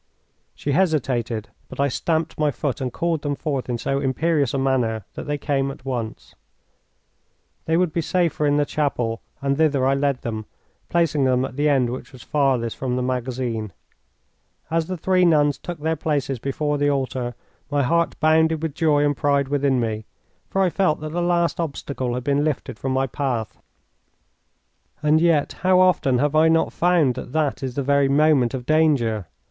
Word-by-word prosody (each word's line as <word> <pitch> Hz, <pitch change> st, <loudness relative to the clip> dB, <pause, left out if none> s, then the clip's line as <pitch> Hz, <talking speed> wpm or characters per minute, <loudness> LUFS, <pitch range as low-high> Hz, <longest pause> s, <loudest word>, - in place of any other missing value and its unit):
She 145 Hz, -, -3 dB
hesitated, 125 Hz, -, 0 dB, 0.2 s
but -, -, -10 dB
I 140 Hz, -, +3 dB
stamped 160 Hz, +4 st, -1 dB
my 150 Hz, -1 st, +3 dB
foot 140 Hz, -2 st, -3 dB
and 130 Hz, -1 st, -2 dB
called 165 Hz, 0 st, -1 dB
them 145 Hz, -1 st, -2 dB
forth 140 Hz, -4 st, -3 dB
in 120 Hz, -, -1 dB
so 135 Hz, +4 st, -1 dB
imperious 140 Hz, 0 st, +1 dB
a -, -, -1 dB
manner 125 Hz, -6 st, 0 dB
that -, -, -7 dB
they 145 Hz, 0 st, -1 dB
came 140 Hz, -1 st, -1 dB
at 135 Hz, -1 st, -10 dB
once. 120 Hz, -4 st, -5 dB, 1.3 s
They 160 Hz, +1 st, +2 dB
would 175 Hz, -3 st, +1 dB
be 170 Hz, -, 0 dB
safer 165 Hz, -3 st, 0 dB
in 145 Hz, 0 st, +2 dB
the 145 Hz, -, +2 dB
chapel, 125 Hz, -7 st, -1 dB, 0.2 s
and 140 Hz, 0 st, +1 dB
thither 145 Hz, -4 st, +2 dB
I 135 Hz, -, +3 dB
led 140 Hz, -1 st, 0 dB
them, 110 Hz, -2 st, -4 dB, 0.4 s
placing 160 Hz, -5 st, +2 dB
them 130 Hz, 0 st, +2 dB
at -, -, -8 dB
the 145 Hz, +2 st, +2 dB
end 130 Hz, -4 st, +2 dB
which 130 Hz, -, -7 dB
was 130 Hz, -, -12 dB
farthest 135 Hz, -6 st, 0 dB
from 125 Hz, -2 st, -2 dB
the 125 Hz, -, -1 dB
magazine. 125 Hz, -4 st, -3 dB, 1.0 s
As 165 Hz, 0 st, +1 dB
the 185 Hz, 0 st, -4 dB
three 185 Hz, +2 st, +2 dB
nuns 145 Hz, -4 st, +3 dB
took 175 Hz, -2 st, -6 dB
their 160 Hz, +2 st, 0 dB
places 145 Hz, -4 st, -1 dB
before 145 Hz, +3 st, -2 dB
the 145 Hz, 0 st, +2 dB
altar 130 Hz, -3 st, -2 dB, 0.3 s
my 145 Hz, -1 st, +1 dB
heart 170 Hz, +6 st, +1 dB
bounded 160 Hz, 0 st, +3 dB
with 160 Hz, -3 st, -2 dB
joy 150 Hz, -2 st, +2 dB
and 145 Hz, 0 st, +1 dB
pride 140 Hz, +2 st, +1 dB
within 140 Hz, -2 st, +1 dB
me, 110 Hz, -2 st, -2 dB, 0.4 s
for 195 Hz, -, +1 dB
I 180 Hz, -, +2 dB
felt 185 Hz, -5 st, +1 dB
that 155 Hz, -, -4 dB
the 175 Hz, +2 st, -1 dB
last 175 Hz, -1 st, +1 dB
obstacle 140 Hz, -5 st, -3 dB
had 125 Hz, -, -4 dB
been 140 Hz, +1 st, +1 dB
lifted 150 Hz, -6 st, -3 dB
from 135 Hz, -, -2 dB
my 130 Hz, +1 st, +1 dB
path. 125 Hz, -4 st, -3 dB, 1.4 s
And 155 Hz, +1 st, +4 dB
yet 165 Hz, -4 st, +2 dB
how 185 Hz, 0 st, +4 dB
often 175 Hz, -8 st, +3 dB
have 145 Hz, +3 st, +1 dB
I 155 Hz, +1 st, +5 dB
not 165 Hz, 0 st, +2 dB
found 170 Hz, -7 st, +3 dB
that 130 Hz, +1 st, -8 dB
that 155 Hz, -3 st, 0 dB
is 130 Hz, -2 st, -4 dB
the 140 Hz, -, -1 dB
very 140 Hz, 0 st, +3 dB
moment 140 Hz, -4 st, +3 dB
of 125 Hz, -2 st, -6 dB
danger? 130 Hz, -, +2 dB
140 Hz, 185 wpm, -22 LUFS, 130-155 Hz, 1.4 s, I